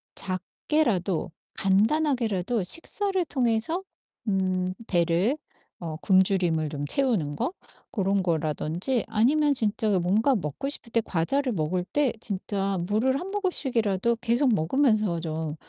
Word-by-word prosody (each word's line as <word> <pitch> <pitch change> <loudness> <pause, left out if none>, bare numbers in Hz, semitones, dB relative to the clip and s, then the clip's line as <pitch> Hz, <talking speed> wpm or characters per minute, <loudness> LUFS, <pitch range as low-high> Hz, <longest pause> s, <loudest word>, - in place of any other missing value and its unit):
작게라도 185 - -1 0.2
간단하게라도 220 - +1
식사를 375 - +1
통해서 255 +5 0 0.4
음 185 -2 0
배를 175 - +2 0.4
어 165 -2 -4
굶주림을 185 -5 +3
좀 145 -1 -4
채우는 200 - 0
거 340 - -1 0.4
고런 195 -4 +1
거라든지 165 - 0
아니면 280 +7 +3
진짜 215 -4 +1
뭔가 210 +10 +2
먹고 170 - -3
싶을 235 -5 -3
때 230 - +2
과자를 245 +9 0
먹을 175 +1 -1
때 285 +4 +1
진짜 195 -1 -2
물을 235 +6 +1
한 365 - -6
모금씩이라도 235 - 0
계속 250 +1 +2
먹으면서 215 - +2
좀 160 -1 -4
205 Hz, 270 characters per minute, -26 LUFS, 180-260 Hz, 0.4 s, 굶주림을